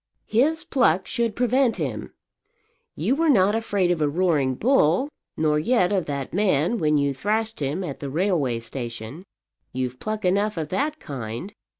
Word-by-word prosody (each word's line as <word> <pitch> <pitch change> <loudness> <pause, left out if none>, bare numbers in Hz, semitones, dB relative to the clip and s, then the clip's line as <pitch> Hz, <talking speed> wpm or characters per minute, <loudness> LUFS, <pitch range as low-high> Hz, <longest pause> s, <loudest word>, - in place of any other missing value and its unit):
"His 295 +8 +2
pluck 185 - +2
should 235 -4 -1
prevent 250 -1 +2
him. 135 - -4 0.8
You 185 - 0
were 325 +2 +2
not 205 -6 +4
afraid 205 -5 +1
of 170 -3 -1
a 150 - +2
roaring 150 -5 +1
bull, 235 - +3 0.3
nor 150 -1 +2
yet 185 +1 +2
of 190 -4 +1
that 140 -2 -4
man 190 +1 +1
when 150 -1 +2
you 140 -1 +1
thrashed 220 +9 -1
him 150 +6 -2
at 145 -6 -5
the 140 - -5
railway 150 - 0
station. 115 - -7 0.5
You've 125 0 -3
pluck 215 -1 -3
enough 200 +2 +1
of 155 -2 -3
that 300 +9 -1
kind. 125 - -6
180 Hz, 165 wpm, -24 LUFS, 140-215 Hz, 0.8 s, not